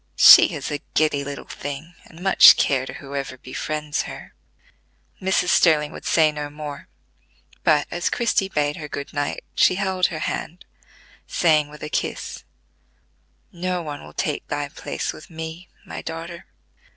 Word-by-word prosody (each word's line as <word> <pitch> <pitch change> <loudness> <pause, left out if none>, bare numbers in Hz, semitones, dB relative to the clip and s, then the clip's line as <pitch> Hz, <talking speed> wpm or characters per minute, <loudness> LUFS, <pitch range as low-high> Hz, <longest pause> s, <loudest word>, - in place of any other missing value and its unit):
"She - - +9
is - - -5
a 145 -1 -3
giddy 150 -2 +2
little 140 0 -7
thing, 145 +4 -7
and 170 +2 -13
much 190 - +8
care 135 -1 +1
to - - -7
whoever 140 -1 -6
befriends 150 +4 -3
her." - - -10 0.9
Mrs. 185 -1 +1
Sterling 155 -4 +4
would - - -10
say 155 -2 +4
no 150 -1 -5
more, 150 -1 -8 0.8
but, 150 -2 +3
as 175 0 -1
Christie 230 -5 0
bade 150 -4 -1
her 150 - -6
good 140 -1 -7
night, 145 0 -2
she - - +4
held 190 -1 +1
her 165 - -6
hand, 180 +4 -5 0.6
saying 155 -3 +2
with 150 0 -12
a - - -3
kiss: - - -3 1.1
"No 180 0 -3
one 145 -2 -7
will - - -12
take 150 -6 -3
thy 145 -1 -3
place 150 - -4
with - - -13
me, 160 +1 -8 0.2
my - - -7
daughter." 165 +1 -7
155 Hz, 155 wpm, -22 LUFS, 145-175 Hz, 1.1 s, She